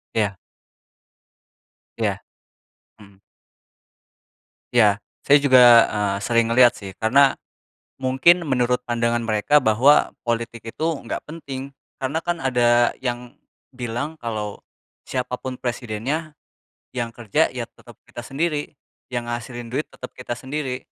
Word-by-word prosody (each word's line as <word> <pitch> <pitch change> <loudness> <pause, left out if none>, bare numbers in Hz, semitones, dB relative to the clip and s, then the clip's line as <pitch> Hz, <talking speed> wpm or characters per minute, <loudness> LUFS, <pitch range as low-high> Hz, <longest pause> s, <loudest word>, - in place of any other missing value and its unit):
Iya. 105 -3 0 1.6
Iya. - - -1 0.8
Hmm. 100 -2 -18 1.5
Iya. 105 -4 +5 0.3
Saya 145 - +7
juga, 130 -3 +6 0.3
eee, 100 -2 -1
sering 115 +2 +2
ngelihat 120 +1 +6
sih 100 -2 -8
karena 135 +5 +5 0.7
mungkin 135 +7 +4
menurut 125 -3 +1
pandangan 120 0 0
mereka 110 +6 +3
bahwa 125 +7 +4
politik 115 -1 -3
itu 155 - -4 0.2
enggak - - -5
penting 140 -3 -7 0.3
karena 135 +3 -2
kan 175 0 -1
ada 120 -3 +3
yang 125 -1 -4 0.4
bilang 125 +5 -4
kalau, 110 -3 -4 0.5
"Siapa 125 -1 -2
pun 130 -1 -5
presidennya 125 +6 -3 0.6
yang 120 -2 -1
kerja 115 -3 +1
ya - - -4
tetap - - -17
kita - - -9
sendiri, 150 +3 -2 0.4
yang 120 -1 -3
ngehasilin 120 0 -5
duit 145 +4 -2
tetep 125 - -10
kita 125 -1 -6
sendiri." 130 0 -4
125 Hz, 115 wpm, -22 LUFS, 115-135 Hz, 1.6 s, Saya